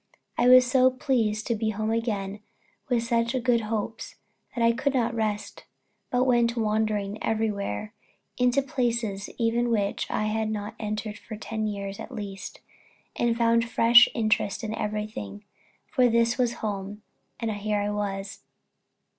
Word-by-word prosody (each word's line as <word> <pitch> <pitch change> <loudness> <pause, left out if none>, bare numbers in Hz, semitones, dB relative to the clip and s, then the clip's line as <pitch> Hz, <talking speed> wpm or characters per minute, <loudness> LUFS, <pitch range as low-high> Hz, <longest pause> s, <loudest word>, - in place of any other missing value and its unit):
I 240 - +2
was 255 0 +8
so 255 0 +4
pleased 250 -6 0
to 235 - 0
be 220 0 -1
at 210 - -4
home 215 0 -1
again 210 -3 -2 0.5
with 240 -2 +2
such 235 +1 0
good 240 -2 +3
hopes, 220 0 -4 0.4
that 235 - 0
I 230 - +6
could 265 +3 -1
not 235 -2 +1
rest, 215 -2 -3 0.4
but 250 0 +2
went 240 -2 +2
wandering 215 -2 0
everywhere 215 - -2 0.4
into 250 +2 +2
places 235 -6 -2
even 235 +1 +1
which 205 -3 -1
I - - -1
had 220 0 -1
not 210 -1 -4
entered 215 0 -4
for 220 - -8
ten 220 0 -3
years 200 -1 -5
at - - -8
least, 200 -5 -7 0.5
and 235 -1 +1
found 230 0 +2
fresh 240 +1 +7
interest 215 -1 0
in 220 -1 -3
everything; 210 - -4 0.4
for 255 -4 +3
this 235 +1 +3
was 245 -2 +1
home, 205 0 -4 0.4
and 230 -2 -1
here 210 0 -1
I 205 0 -1
was. 200 -1 -4
220 Hz, 155 wpm, -26 LUFS, 210-235 Hz, 0.5 s, was